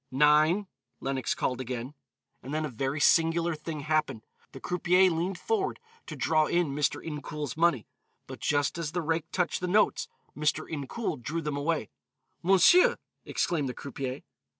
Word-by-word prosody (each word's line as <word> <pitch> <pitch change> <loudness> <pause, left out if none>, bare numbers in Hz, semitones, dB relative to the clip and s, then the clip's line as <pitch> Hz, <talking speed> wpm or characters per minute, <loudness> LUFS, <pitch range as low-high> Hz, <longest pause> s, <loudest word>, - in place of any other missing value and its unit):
"Nine," 150 +8 +4 0.3
Lenox 135 -1 -2
called 125 0 -1
again. 125 +1 -5 0.5
And 135 +4 -5
then 155 0 0
a - - -4
very 135 +4 -2
singular 165 +2 +3
thing 155 0 -6
happened. 150 -7 0 0.3
The 135 - -10
croupier 180 +3 +3
leaned 170 +3 -2
forward 395 - -1 0.3
to - - -6
draw 155 -1 +2
in 175 -3 +1
Mr. 145 +1 -1
Incoul's 150 -2 -5
money, 160 -8 +2 0.4
but - - -9
just 145 +3 0
as 155 -2 -3
the 175 - 0
rake 160 +1 -1
touched 180 -3 -1
the 180 - -1
notes, 215 - +2 0.3
Mr. 150 +1 0
Incoul 155 - -4
drew 165 +7 -3
them 150 -1 -2
away. 145 -4 -1 0.5
"Monsieur!" 195 - +6 0.3
exclaimed 150 -6 -1
the 125 - -6
croupier. 135 -1 -5
155 Hz, 155 wpm, -28 LUFS, 140-170 Hz, 0.5 s, Monsieur